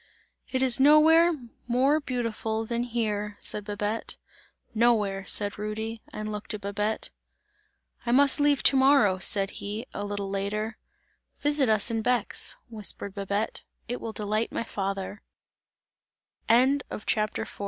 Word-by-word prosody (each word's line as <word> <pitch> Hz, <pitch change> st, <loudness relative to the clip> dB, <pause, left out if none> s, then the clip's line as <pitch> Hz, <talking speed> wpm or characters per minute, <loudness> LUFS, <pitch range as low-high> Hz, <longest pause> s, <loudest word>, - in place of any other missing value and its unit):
"It 260 Hz, 0 st, 0 dB
is 260 Hz, -1 st, +5 dB
nowhere 315 Hz, +4 st, +6 dB, 0.4 s
more 265 Hz, +5 st, +2 dB
beautiful 230 Hz, -4 st, -3 dB
than 235 Hz, +1 st, -2 dB
here!" 210 Hz, -4 st, -2 dB
said 210 Hz, -, -2 dB
Babette. 210 Hz, +2 st, -4 dB, 0.6 s
"Nowhere!" 215 Hz, -4 st, +1 dB
said 205 Hz, 0 st, 0 dB
Rudy, 220 Hz, +2 st, -4 dB
and 215 Hz, 0 st, -5 dB
looked 210 Hz, 0 st, -4 dB
at 210 Hz, -, -8 dB
Babette. 205 Hz, +2 st, -3 dB, 0.9 s
"I 235 Hz, -, -2 dB
must 280 Hz, +3 st, +6 dB
leave 290 Hz, -1 st, +2 dB
to -, -, +7 dB
morrow!" 265 Hz, -8 st, +4 dB
said 195 Hz, +1 st, +4 dB
he, 210 Hz, +4 st, -5 dB
a 205 Hz, -, -4 dB
little 205 Hz, -1 st, -4 dB
later. 210 Hz, +3 st, -3 dB, 0.6 s
"Visit 290 Hz, -4 st, +2 dB
us 215 Hz, +1 st, +2 dB
in 225 Hz, -1 st, -1 dB
Bex," 250 Hz, -, -1 dB
whispered 210 Hz, -3 st, -4 dB
Babette, 200 Hz, +2 st, -3 dB, 0.2 s
"it 245 Hz, +1 st, -4 dB
will 225 Hz, -, -5 dB
delight 215 Hz, +1 st, -2 dB
my -, -, -2 dB
father!" 195 Hz, -1 st, -4 dB
220 Hz, 125 wpm, -27 LUFS, 205-245 Hz, 0.9 s, to